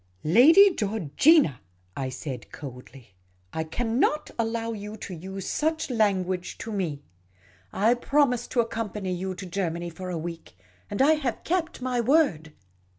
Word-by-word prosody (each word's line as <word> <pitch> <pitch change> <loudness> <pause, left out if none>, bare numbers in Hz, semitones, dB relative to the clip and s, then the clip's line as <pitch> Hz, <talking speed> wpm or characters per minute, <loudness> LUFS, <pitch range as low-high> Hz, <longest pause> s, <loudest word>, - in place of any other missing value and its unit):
" - - -37 0.2
Lady 365 +9 +8
Georgina," 210 - +3 0.3
I 130 -1 -3
said, 130 -1 -7
coldly, 125 -5 -11 0.2
" 90 0 -38
I 160 - -1
cannot 240 - 0
allow 230 0 -1
you 210 0 -7
to 195 - -7
use 190 +3 -7
such 315 -2 -1
language 190 -5 0
to 225 - -6
me. 165 -9 -3 0.7
I 220 +4 +3
promised 250 0 +1
to 240 - +4
accompany 215 -4 -3
you 185 +1 -4
to 190 +1 -7
Germany 175 -2 -3
for 185 +3 -7
a 175 - -3
week; 165 - -7 0.3
and 205 +6 +1
I 305 +3 +6
have 275 -7 -2
kept 335 -6 -2
my 250 -1 0
word. 235 - +2
205 Hz, 155 wpm, -26 LUFS, 165-245 Hz, 0.7 s, Lady